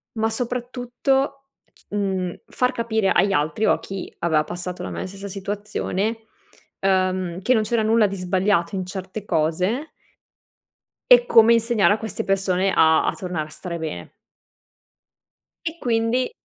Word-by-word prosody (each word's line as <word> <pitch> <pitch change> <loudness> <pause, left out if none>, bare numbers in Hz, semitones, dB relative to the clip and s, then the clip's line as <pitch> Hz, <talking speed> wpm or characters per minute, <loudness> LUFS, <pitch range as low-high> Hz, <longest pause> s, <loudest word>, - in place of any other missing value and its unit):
Ma 220 0 +1
soprattutto, 250 +3 -2 0.3
c - - -28
mhmm, 190 -3 -2
far 250 0 0
capire 220 -5 0
agli 200 0 +3
altri 155 +7 +1
o - - +5
a - - 0
chi 195 -1 -7
aveva 160 -3 +2
passato 180 +1 -6
la - - -5
mia - - -4
stessa 200 +1 -8
situazione, 205 +2 -3 0.6
uhm, 185 -2 0
che 255 +4 +3
non 220 - +3
c'era 225 0 0
nulla 220 0 +4
di 195 - -5
sbagliato 185 -1 +1
in 185 -1 -2
certe 190 +2 -6
cose 180 - 0 1.2
e - - +7
come 230 - +6
insegnare 230 -3 +3
a 215 - -4
queste 220 -1 -4
persone 195 -1 +1
a 160 0 +4
a - - +1
tornare 175 -5 -4
a - - -15
stare 170 +3 -6
bene. 160 -2 -6 1.5
E 320 +1 -3
quindi 235 0 0
200 Hz, 150 wpm, -22 LUFS, 185-230 Hz, 1.5 s, e